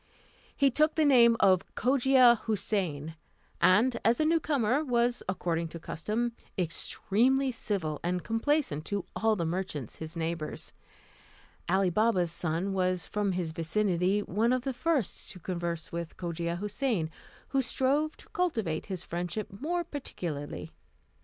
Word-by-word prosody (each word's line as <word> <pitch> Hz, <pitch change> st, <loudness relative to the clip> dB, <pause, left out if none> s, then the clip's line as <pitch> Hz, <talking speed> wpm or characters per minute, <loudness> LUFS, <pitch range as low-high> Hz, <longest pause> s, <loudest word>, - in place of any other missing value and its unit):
He 275 Hz, -1 st, +4 dB
took 305 Hz, +4 st, +2 dB
the 315 Hz, -, +3 dB
name 235 Hz, -4 st, +6 dB
of 185 Hz, -2 st, +3 dB
Cogia 255 Hz, -1 st, +5 dB
Houssain, 185 Hz, -8 st, -1 dB, 0.5 s
and, 235 Hz, +6 st, +4 dB
as 230 Hz, +2 st, +3 dB
a 310 Hz, -, +3 dB
new 330 Hz, +1 st, +3 dB
comer, 280 Hz, -2 st, +1 dB
was, 245 Hz, -2 st, +1 dB
according 170 Hz, -3 st, -1 dB
to 165 Hz, +1 st, -8 dB
custom, 215 Hz, +9 st, -2 dB, 0.3 s
extremely 235 Hz, -, +1 dB
civil 185 Hz, -, -2 dB
and 180 Hz, +1 st, -1 dB
complaisant 225 Hz, -, 0 dB
to 200 Hz, -3 st, -2 dB
all 220 Hz, 0 st, +2 dB
the 170 Hz, -4 st, -2 dB
merchants 160 Hz, -, -4 dB
his 160 Hz, +1 st, -7 dB
neighbours. 165 Hz, -1 st, -4 dB, 1.0 s
Ali 190 Hz, 0 st, +3 dB
Baba's 185 Hz, -3 st, +2 dB
son 170 Hz, +3 st, -2 dB
was, 185 Hz, -1 st, 0 dB
from 205 Hz, -2 st, -1 dB
his 175 Hz, -3 st, -2 dB
vicinity, 180 Hz, +3 st, +1 dB
one 220 Hz, +7 st, +1 dB
of 255 Hz, -1 st, +1 dB
the 270 Hz, -1 st, -2 dB
first 285 Hz, -, -1 dB
to 185 Hz, -, -9 dB
converse 170 Hz, -2 st, -3 dB
with 170 Hz, -1 st, -5 dB
Cogia 170 Hz, -1 st, -3 dB
Houssain, 210 Hz, -, -1 dB, 0.4 s
who 270 Hz, -, +2 dB
strove 275 Hz, +5 st, +1 dB
to -, -, -16 dB
cultivate 225 Hz, -, -1 dB
his 185 Hz, -4 st, -5 dB
friendship 175 Hz, +5 st, -4 dB
more 345 Hz, +4 st, 0 dB
particularly. 170 Hz, -, -6 dB
200 Hz, 140 wpm, -29 LUFS, 170-250 Hz, 1.0 s, name